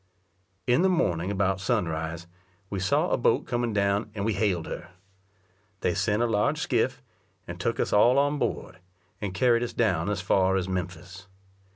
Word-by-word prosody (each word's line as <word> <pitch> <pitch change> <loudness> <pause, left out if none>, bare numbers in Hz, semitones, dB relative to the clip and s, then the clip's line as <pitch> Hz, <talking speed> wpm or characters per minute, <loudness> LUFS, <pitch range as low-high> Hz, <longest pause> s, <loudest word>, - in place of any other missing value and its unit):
In 125 +5 +3
the 190 - +4
morning 90 - 0
about 95 -1 0
sunrise, 80 -2 -2 0.5
we 100 - -2
saw 95 0 +1
a - - +3
boat - - +2
coming 120 -1 -1
down, 100 +1 0
and 100 -1 -2
we 110 - +1
hailed 95 -4 0
her. 90 - -7 0.9
They 90 - +1
sent 105 +5 +1
a - - +3
large 105 -3 +1
skiff, - - 0 0.4
and - - -7
took - - -1
us - - 0
all 120 +5 +5
on 145 +1 +2
board, 95 -8 -3 0.4
and 100 -2 -2
carried 120 +3 +3
us 120 - -3
down 105 -4 +1
as 105 -1 -1
far 95 +1 +2
as 95 -1 -1
Memphis. 90 0 -5
100 Hz, 175 wpm, -27 LUFS, 90-115 Hz, 0.9 s, all